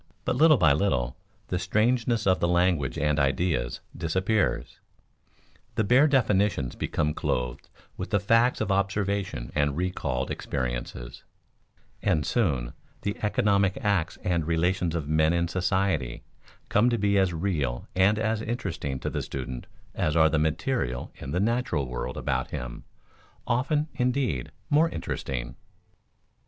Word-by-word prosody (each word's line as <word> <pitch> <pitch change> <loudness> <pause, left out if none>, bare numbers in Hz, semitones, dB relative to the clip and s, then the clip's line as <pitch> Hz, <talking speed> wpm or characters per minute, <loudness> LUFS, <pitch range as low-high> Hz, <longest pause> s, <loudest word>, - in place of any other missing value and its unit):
But - - +1
little 155 -2 +6
by 80 -9 +5
little 65 -8 0 0.3
the 90 - 0
strangeness 115 +4 +1
of 95 -1 +3
the 85 - +2
language 85 -4 +2
and 75 0 +1
ideas 70 -2 0
disappears; 95 +5 0 1.0
the 110 - +2
bare 125 +8 +5
definitions 105 - +2
become 75 0 -1
clothed 60 -3 -2 0.3
with 90 - -5
the 100 0 +2
facts 115 +5 +3
of 100 - 0
observation 100 - -1
and 75 -1 +1
recalled 85 -8 -2
experiences; - - -4 0.8
and 75 -2 +1
soon 70 - 0 0.3
the 100 0 -1
"economic" 100 -2 +2
acts 100 -5 0
and 85 -3 0
relations 85 +1 +1
of 80 -4 -2
men 80 +1 +3
in 85 0 +1
society 90 -7 0 0.4
come 110 +4 +3
to 120 - +1
be 100 -1 +2
as 95 -2 +3
real 80 -8 -2
and 95 +3 +4
as 110 0 0
interesting 90 - -3
to - - -2
the - - -2
student 65 -2 -6 0.3
as 75 - 0
are 80 -1 +6
the 80 - +1
materials 75 - -1
in 65 - -7
the 90 - 0
natural 105 - 0
world 60 0 -4
about - - -1
him - - -6 0.6
often, 140 +5 +1
indeed, 125 - 0 0.2
more 155 +3 +4
interesting. - - -4
90 Hz, 140 wpm, -27 LUFS, 70-105 Hz, 1.0 s, little